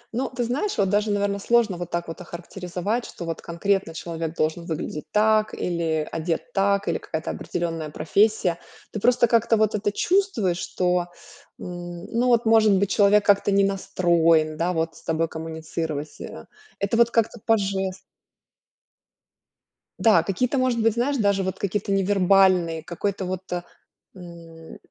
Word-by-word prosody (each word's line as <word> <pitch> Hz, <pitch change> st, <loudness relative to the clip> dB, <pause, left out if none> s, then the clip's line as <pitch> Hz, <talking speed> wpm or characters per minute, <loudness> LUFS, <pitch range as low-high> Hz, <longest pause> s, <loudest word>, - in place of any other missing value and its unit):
Ну, 260 Hz, +1 st, -1 dB
ты 250 Hz, -1 st, -3 dB
знаешь, 265 Hz, -, -2 dB
вот 195 Hz, -2 st, +2 dB
даже, 210 Hz, +2 st, +1 dB
наверно, 200 Hz, 0 st, 0 dB
сложно 230 Hz, -2 st, +2 dB
вот 175 Hz, -1 st, -6 dB
так 170 Hz, 0 st, -3 dB
вот 165 Hz, +2 st, -7 dB
охарактеризовать, 180 Hz, +5 st, -4 dB
что 170 Hz, -, -8 dB
вот 165 Hz, -1 st, -4 dB
конкретно 180 Hz, 0 st, -1 dB
человек 165 Hz, -1 st, -5 dB
должен 160 Hz, +2 st, -1 dB
выглядеть 155 Hz, -2 st, -5 dB
так, 215 Hz, 0 st, +2 dB
или 165 Hz, -3 st, -1 dB
одет 165 Hz, +8 st, -3 dB
так, 200 Hz, +1 st, +1 dB
или 170 Hz, -, 0 dB
какая-то 160 Hz, +1 st, -4 dB
определённая 165 Hz, -3 st, -4 dB
профессия. 180 Hz, +3 st, +1 dB, 0.3 s
Ты 210 Hz, -, -4 dB
просто 245 Hz, +2 st, +4 dB
как-то 230 Hz, 0 st, +3 dB
вот 215 Hz, -1 st, +2 dB
это 205 Hz, 0 st, 0 dB
чувствуешь, 245 Hz, -, +1 dB
что, 180 Hz, -1 st, 0 dB, 0.5 s
м, 175 Hz, 0 st, -7 dB
ну, 240 Hz, +2 st, +1 dB
вот, 240 Hz, -1 st, +3 dB
может 220 Hz, -2 st, +5 dB
быть, 200 Hz, 0 st, 0 dB
человек 205 Hz, +1 st, +4 dB
как-то 205 Hz, 0 st, +3 dB
не 200 Hz, 0 st, +4 dB
настроен, 170 Hz, -5 st, +2 dB
да, 170 Hz, +3 st, -1 dB
вот 165 Hz, -1 st, -1 dB
с -, -, -15 dB
тобой 165 Hz, 0 st, 0 dB
коммуницировать. 160 Hz, -2 st, -5 dB
Э, -, -, -8 dB, 0.3 s
это 200 Hz, +3 st, -1 dB
вот 235 Hz, 0 st, +5 dB
как-то 230 Hz, 0 st, 0 dB
по 225 Hz, -1 st, +3 dB
жестам. 195 Hz, -2 st, -2 dB, 2.1 s
Да, 210 Hz, -8 st, +5 dB
какие-то, 240 Hz, +9 st, -1 dB
может 255 Hz, -3 st, +1 dB
быть, 225 Hz, -1 st, +3 dB
знаешь, 265 Hz, +4 st, 0 dB
даже 200 Hz, -3 st, +2 dB
вот 190 Hz, 0 st, -4 dB
какие-то 200 Hz, 0 st, -2 dB
невербальные, 190 Hz, -4 st, +3 dB
какой-то 190 Hz, +3 st, -3 dB
вот, 185 Hz, 0 st, -3 dB
э, 175 Hz, 0 st, -1 dB, 0.5 s
м, 170 Hz, -2 st, -12 dB
190 Hz, 155 wpm, -24 LUFS, 170-215 Hz, 2.1 s, может